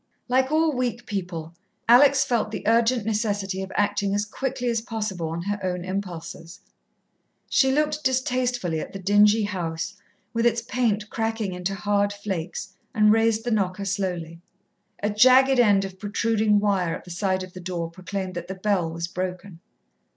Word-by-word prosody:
Like 260 +2 +2
all 315 0 +3
weak 245 -2 -2
people, 175 -6 -5 0.3
Alex 270 +3 +6
felt 235 -5 0
the 215 - -5
urgent 230 0 +3
necessity 205 -3 -1
of 190 0 -6
acting 205 -1 +1
as 205 +1 0
quickly 255 +3 -3
as 230 -2 +1
possible 210 -8 -3
on 165 +1 -4
her 205 +2 -2
own 180 -1 -2
impulses. 170 -3 -6 0.9
She 265 -1 +4
looked 300 +2 0
distastefully 250 - 0
at - - -7
the - - -4
dingy 205 +3 +4
house, 175 -2 -3 0.4
with 230 0 +2
its 235 0 0
paint 225 -4 -1
cracking 225 -3 -2
into 180 +2 -3
hard 205 0 +1
flakes, 190 -4 -5 0.2
and 210 -1 +5
raised 225 0 +2
the 240 - -2
knocker 200 -2 0
slowly. 180 -4 -3 0.6
A 205 - +1
jagged 255 +4 +6
end 205 -4 +4
of 190 -1 -9
protruding 215 0 +1
wire 190 -5 +1
at - - -10
the 180 - -10
side 185 +1 -1
of 185 -1 -10
the 185 - -9
door 170 -2 -4
proclaimed 185 +1 -5
that 175 0 -6
the 190 - -5
bell 185 -3 0
was 170 +1 -4
broken. 180 0 -5
205 Hz, 165 wpm, -24 LUFS, 185-230 Hz, 0.9 s, Alex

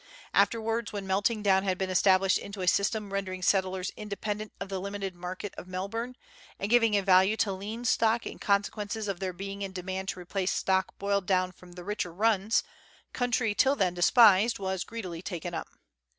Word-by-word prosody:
Afterwards, 225 -1 +1
when 200 -2 -5
melting 200 +3 0
down 190 -2 +4
had 190 -2 -1
been 190 0 -2
established 190 0 +4
into 200 -1 -7
a - - -3
system 200 +2 +1
rendering 185 -2 -3
settlers 190 -1 +1
inde 210 -2 -6
pendent 215 0 -3
of - - -4
the 190 -1 -4
limited 200 -1 -4
market 180 +3 -6
of - - -10
Melbourne, 215 +7 -4 0.4
and 200 +3 -3
giving 230 -3 +5
a 200 - 0
value 190 +2 +5
to 210 - +1
lean 215 +5 -6
stock 225 0 +2
in - - -7
consequence 205 +1 0
of 205 -5 -3
their 190 -1 -2
being 195 +2 -7
in 195 -1 -4
demand 190 +1 -4
to - - -4
replace 185 +1 -2
stock 190 0 0
boiled 200 -2 -1
down 185 -1 +2
from 180 -1 -16
the 180 0 -9
richer 205 -2 -3
runs, 210 +3 +2 0.5
country 245 -3 +1
till 270 +6 +3
then 190 -8 +1
despised 210 +4 +5
was 190 -2 -2
greedily 185 -7 -6
taken 175 -2 -5
up. - - -4
195 Hz, 190 wpm, -29 LUFS, 185-210 Hz, 0.5 s, giving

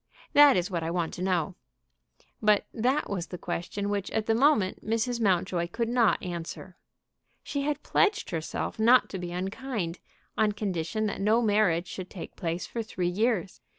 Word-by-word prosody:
That 290 -4 +8
is 180 +2 -1
what 170 -2 -1
I 165 - -2
want 170 -1 -1
to 180 - -6
know." 180 -2 0 0.9
But 210 -2 +4
that 255 +6 +1
was 180 -4 -3
the 180 - -7
question 175 +4 -4
which 200 -2 -2
at 220 - -1
the 225 - +2
moment 230 -6 +2
Mrs. 230 +2 -1
Mountjoy 180 -3 +1
could 230 +6 -2
not 235 -3 +3
answer. 175 +1 -6 0.7
She 285 - -3
had 290 +1 -2
pledged 420 +1 +1
herself 165 +5 -3
not 240 +3 +5
to 190 - -5
be 175 -1 -5
unkind, 190 0 -3 0.4
on 215 -1 +2
condition 205 0 -2
that 205 -2 -3
no 215 +3 +4
marriage 205 -6 +2
should 185 0 -7
take 180 - -9
place 170 +1 -3
for 235 - -4
three 185 -5 -2
years. 200 -1 0
200 Hz, 175 wpm, -28 LUFS, 175-230 Hz, 0.9 s, That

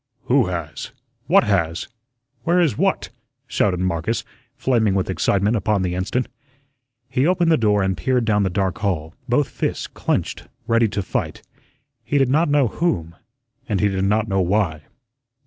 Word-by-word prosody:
"Who 125 -3 +3
has? 85 -5 -5 0.3
What - - +5
has? 85 -5 0 0.5
Where 175 +7 +2
is 160 -11 +2
what?" - - 0 0.4
shouted 90 -3 0
Marcus, 95 +6 -1 0.3
flaming 110 -6 +1
with 95 -1 0
excitement 100 +4 +1
upon 105 -1 +1
the 90 -1 -1
instant. 95 +8 -1 0.8
He 135 +3 +1
opened 175 -2 +3
the - - +6
door 105 -6 +2
and 95 0 0
peered 120 +8 0
down 105 -2 +2
the 95 - +1
dark 95 +2 -1
hall, 85 -7 -2 0.2
both 135 +4 +2
fists - - -3
clenched, - - -2 0.2
ready 115 0 +3
to 100 -1 -3
fight - - -3 0.6
he 145 - 0
did 135 -2 +3
not 155 +4 +3
know 145 -3 +3
whom, 85 - -1 0.5
and 100 -3 +1
he 105 - +3
did 95 0 -1
not 105 +2 +1
know 95 -2 +1
why. 90 -5 0
105 Hz, 165 wpm, -21 LUFS, 95-125 Hz, 0.8 s, the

